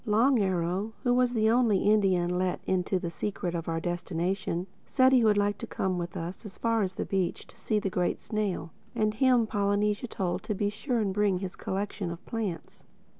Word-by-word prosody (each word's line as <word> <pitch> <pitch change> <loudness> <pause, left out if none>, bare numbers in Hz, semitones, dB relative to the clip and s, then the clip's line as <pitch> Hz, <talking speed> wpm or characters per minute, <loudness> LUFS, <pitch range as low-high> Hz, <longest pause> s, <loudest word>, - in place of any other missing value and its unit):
Long 230 +5 +4
Arrow, 190 +2 0
who 245 - +3
was 250 0 +3
the 220 -1 +3
only 230 -5 +3
Indian 185 -4 +3
let 185 -1 0
into 185 0 +1
the 175 -2 -4
secret 180 -1 -3
of 170 -1 -3
our 165 0 0
destination, 175 +1 -2 0.2
said 260 -1 +4
he 255 -3 +5
would 210 -2 +4
like 205 -1 +1
to - - -5
come 185 -2 -1
with 175 0 -5
us 170 +6 -5
as 205 -4 -10
far 230 -1 +1
as 190 -2 -1
the - - -2
beach 190 -3 -1
to - - -18
see 215 - -1
the 200 -2 -1
Great 180 -1 0
Snail; 200 -6 -2 0.2
and 215 -2 +1
him 245 0 +4
Polynesia 205 +1 0
told 185 -5 -2
to 210 - -3
be 205 +1 0
sure 235 +4 -2
and 195 -3 0
bring 205 -2 +2
his 185 0 -5
collection 195 -1 -3
of 170 +2 -8
plants. 215 -7 -5
200 Hz, 205 wpm, -28 LUFS, 180-215 Hz, 0.2 s, he